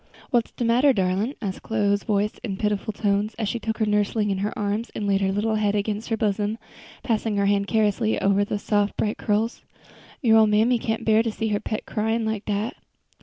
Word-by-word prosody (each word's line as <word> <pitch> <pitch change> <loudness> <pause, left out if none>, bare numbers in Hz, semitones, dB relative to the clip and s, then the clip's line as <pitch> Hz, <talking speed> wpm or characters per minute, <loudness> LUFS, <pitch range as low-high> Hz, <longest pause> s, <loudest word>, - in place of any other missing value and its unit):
"What's 235 -2 +2
de 240 - -2
matter, 250 +4 +4
darlin'?" 195 +6 0
asked 190 -2 -4
Chloe's 205 -2 +1
voice 210 -1 0
in 195 -5 -3
pitiful 210 0 -1
tones, 205 +1 0
as 220 -2 -1
she 235 - -2
took 220 0 -3
her 220 - +1
nursling 210 0 +1
in 190 - -1
her 205 +2 -1
arms 210 +2 -2
and 210 - -3
laid 200 -1 +2
her 190 0 +1
little 210 +3 0
head 210 -1 +1
against 210 +2 -2
her 225 - 0
bosom, 210 0 0 0.5
passing 220 -3 0
her 200 - +2
hand 200 0 +2
caressingly 220 0 +1
over 200 +1 +3
the 205 - -2
soft 205 0 0
bright 210 0 -1
curls; 215 +2 0 0.6
"your 225 -2 +6
ole 220 - +6
mammy 220 +4 +3
can't 225 0 -2
bear 220 0 +5
to 230 -1 -1
see 220 +1 -2
her 205 -1 0
pet 215 0 -4
cryin' 225 +1 -1
like 220 -1 -2
dat." 210 +3 -2
210 Hz, 215 wpm, -24 LUFS, 205-225 Hz, 0.6 s, your